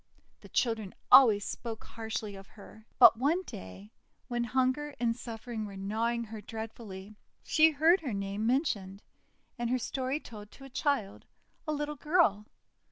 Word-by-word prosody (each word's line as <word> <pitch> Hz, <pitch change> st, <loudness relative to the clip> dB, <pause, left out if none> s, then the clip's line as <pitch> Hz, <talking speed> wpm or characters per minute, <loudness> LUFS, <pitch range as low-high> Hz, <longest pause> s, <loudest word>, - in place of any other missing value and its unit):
The -, -, -15 dB
children 225 Hz, -5 st, -1 dB, 0.2 s
always 220 Hz, -6 st, +8 dB
spoke 225 Hz, -2 st, -6 dB
harshly 220 Hz, -2 st, -5 dB
of 195 Hz, 0 st, -11 dB
her. 215 Hz, +1 st, -15 dB
But 240 Hz, -2 st, +8 dB
one 320 Hz, +8 st, +1 dB
day 95 Hz, -, -10 dB, 0.4 s
when 240 Hz, -1 st, -1 dB
hunger 260 Hz, +4 st, 0 dB
and 230 Hz, -1 st, +1 dB
suffering 230 Hz, -2 st, -6 dB
were 200 Hz, -1 st, -9 dB
gnawing 225 Hz, +4 st, -1 dB
her 220 Hz, -1 st, -8 dB
dreadfully, 215 Hz, -2 st, -8 dB, 0.3 s
she 315 Hz, 0 st, +5 dB
heard 320 Hz, +4 st, +4 dB
her 275 Hz, -6 st, -4 dB
name 200 Hz, +2 st, -2 dB
mentioned, 210 Hz, -, -1 dB, 0.6 s
and 240 Hz, -1 st, -1 dB
her 255 Hz, -, +2 dB
story 260 Hz, +3 st, -2 dB
told 210 Hz, -7 st, -11 dB
to 270 Hz, -, -14 dB
a 270 Hz, -, -10 dB
child 260 Hz, -8 st, -1 dB, 0.2 s
— -, -, -40 dB
a -, -, 0 dB
little 295 Hz, 0 st, -3 dB
girl. 265 Hz, -, +2 dB
230 Hz, 160 wpm, -30 LUFS, 210-270 Hz, 0.6 s, always